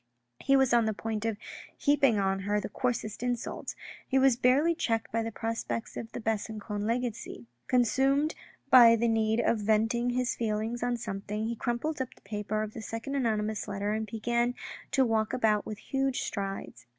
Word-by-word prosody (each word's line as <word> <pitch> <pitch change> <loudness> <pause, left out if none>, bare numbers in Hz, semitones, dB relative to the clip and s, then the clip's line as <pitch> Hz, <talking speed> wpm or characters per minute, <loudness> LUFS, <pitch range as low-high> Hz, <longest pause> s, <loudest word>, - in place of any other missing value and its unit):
He 275 - +3
was 265 -2 +4
on 235 -1 +5
the 220 -1 -1
point 220 0 -3
of 225 -2 -1 0.4
heaping 280 -6 +3
on 195 -1 +1
her 205 +2 0
the 205 - -5
coarsest 225 -2 -2
insults 245 -1 -3 0.3
He 265 - +1
was 265 -2 +5
barely 265 +7 +3
checked 225 -8 -1
by 230 - 0
the 225 0 -3
prospects 225 +1 -3
of 225 - -6
the - - -5
Besancon 215 -1 -3
legacy. 230 - -3 0.2
Consumed 270 +4 +2 0.4
by 235 -3 +9
the 235 +1 +1
need 225 0 +2
of 230 - +1
venting 225 +3 +2
his 250 0 0
feelings 225 +1 -2
on 245 0 0
something, 210 -1 -4
he 235 +1 -2
crumpled 255 +6 -2
up 255 - -5
the - - -23
paper 210 +1 -3
of 215 0 -6
the 225 - -7
second 225 +5 -5
anonymous 220 -6 -1
letter 200 0 -2
and 220 0 -2
began 235 +3 0 0.3
to 265 -1 +3
walk 220 -2 0
about 215 -4 +2
with 215 - -5
huge 270 +3 -1
strides. 195 - -5
225 Hz, 180 wpm, -29 LUFS, 215-245 Hz, 0.4 s, by